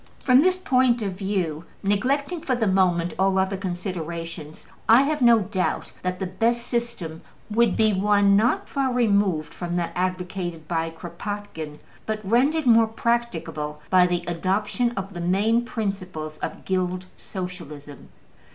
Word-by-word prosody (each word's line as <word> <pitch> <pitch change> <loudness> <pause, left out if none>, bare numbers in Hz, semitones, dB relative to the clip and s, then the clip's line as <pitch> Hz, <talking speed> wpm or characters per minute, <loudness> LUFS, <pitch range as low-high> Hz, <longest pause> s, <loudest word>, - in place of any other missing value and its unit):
From 255 0 +6
this 370 +3 +3
point 255 -8 +2
of 200 - -1
view, 185 -5 -2 0.2
neglecting 280 - 0
for 260 - 0
the 235 -2 0
moment 180 -3 +2
all 190 0 +3
other 190 +1 +1
considerations, 170 -4 -5 0.2
I 235 +4 +8
have 300 0 -1
no 235 -2 +7
doubt 190 -1 -2
that 180 0 -2
the 190 - -3
best 230 +6 0
system 235 -10 -3 0.3
would 230 -1 +3
be 220 -1 +4
one 200 0 +4
not 225 +5 +2
far 270 -2 0
removed 200 -9 +1
from 175 -1 -4
that 175 -1 -1
advocated 180 -3 -3
by 165 -1 -1
Kropotkin, 170 -2 -6 0.3
but 215 -1 -1
rendered 275 +8 +3
more 230 -2 +6
practicable 220 -10 -2
by 180 -1 +6
the 175 -1 -1
adoption 190 +7 0
of 195 +1 -4
the 175 - -5
main 210 +7 +2
principles 185 -9 -4
of - - -5
Guild 185 -1 -1
Socialism. 165 -7 -8
190 Hz, 145 wpm, -24 LUFS, 175-230 Hz, 0.3 s, I